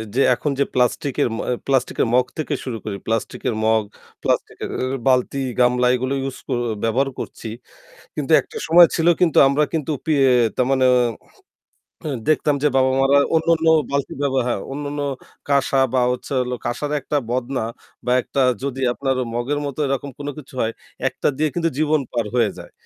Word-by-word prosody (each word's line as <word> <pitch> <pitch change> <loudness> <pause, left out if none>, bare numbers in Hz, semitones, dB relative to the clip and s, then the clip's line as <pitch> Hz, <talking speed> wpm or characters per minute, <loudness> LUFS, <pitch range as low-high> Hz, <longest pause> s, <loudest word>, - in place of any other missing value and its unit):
যে 135 - +3
এখন 145 - -2
যে 140 - +3
প্লাস্টিকের 125 +1 +1
ম - - -5 0.3
প্লাস্টিকের 130 -3 +1
মগ 125 0 +4
থেকে 155 -1 -2
শুরু 120 -4 -4
করে 100 -2 -4
প্লাস্টিকের 115 +1 -2
মগ, 110 -1 +3 0.4
প্লাস্টিকের - - -1
এ 130 - 0 0.2
বালতি, 130 +1 +2 0.2
গামলা 125 0 +3
এগুলো 130 +2 -2
ইউজ 135 -1 -4
ক - - -26 0.3
ব্যবহার 130 +5 +1
করছি 115 - -6 0.7
কিন্তু 150 +1 -2
একটা - - -14
সময় 170 +2 +8
ছিল 165 0 0
কিন্তু 175 -4 +3
আমরা 140 +2 +2
কিন্তু 155 -1 -1
পিয়ে 140 -4 +3 0.3
তার 125 - +2
মানে 130 -1 +3 1.4
দেখতাম 150 -1 +3
যে 150 - +4
বাবা-মারা 135 +1 +4 0.2
অন্যান্য 165 0 +2 0.2
বালতি 140 -1 -2
ব্যবহার 135 -3 +1
হ্যাঁ, 110 -5 -1
অন্যান্য 145 0 -4 0.5
কাশা 140 -1 +2
বা 125 - +3
হচ্ছে 125 - -6
হলো 125 0 -2
কাশার 135 +5 -2
একটা 145 - -2
বদনা 130 0 -1 0.4
বা 125 - +2
একটা 140 - -1 0.2
যদি 135 -1 -3
আপনার 135 +1 -1 0.2
মগের 125 +5 -1
মতো 140 0 -6
এরকম 135 +1 -2
কোন 145 0 -5
কিছু 135 -2 -12
হয় 115 0 0 0.4
একটা - - -2
দিয়ে 155 +2 +1
কিন্তু 165 -1 +1
জীবন 155 0 +2
পার 120 -3 -1
হয়ে 115 -4 +3
যায়। - - -11
135 Hz, 165 wpm, -21 LUFS, 125-145 Hz, 1.4 s, সময়